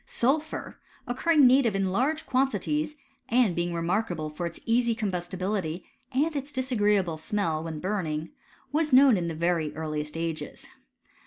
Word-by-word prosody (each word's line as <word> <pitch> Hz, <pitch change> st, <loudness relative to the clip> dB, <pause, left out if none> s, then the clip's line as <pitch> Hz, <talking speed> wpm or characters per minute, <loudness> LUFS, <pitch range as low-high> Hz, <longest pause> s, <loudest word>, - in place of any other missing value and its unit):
Sulphur 300 Hz, +6 st, -1 dB, 0.3 s
occurring 285 Hz, +4 st, +3 dB
native 250 Hz, -4 st, +5 dB
in 195 Hz, -1 st, 0 dB
large 280 Hz, +10 st, 0 dB
quantities, 300 Hz, +3 st, 0 dB, 0.3 s
and 235 Hz, -7 st, +3 dB
being 175 Hz, 0 st, -1 dB
remarkable 170 Hz, -2 st, -1 dB
for 170 Hz, +3 st, -3 dB
its 170 Hz, -, -9 dB
easy 235 Hz, 0 st, +2 dB
combustibility, 185 Hz, -3 st, -2 dB, 0.3 s
and 295 Hz, +5 st, +1 dB
its 280 Hz, +1 st, -3 dB
disagreeable 210 Hz, -, +1 dB
smell 165 Hz, -5 st, 0 dB
when 160 Hz, -2 st, -5 dB
burning, 165 Hz, -4 st, -2 dB, 0.4 s
was 305 Hz, +1 st, +1 dB
known 260 Hz, -1 st, +7 dB
in 175 Hz, -3 st, -1 dB
the 165 Hz, -, -3 dB
very 165 Hz, -2 st, 0 dB
earliest 155 Hz, -1 st, -4 dB
ages. 165 Hz, -2 st, -4 dB
200 Hz, 140 wpm, -27 LUFS, 165-260 Hz, 0.4 s, known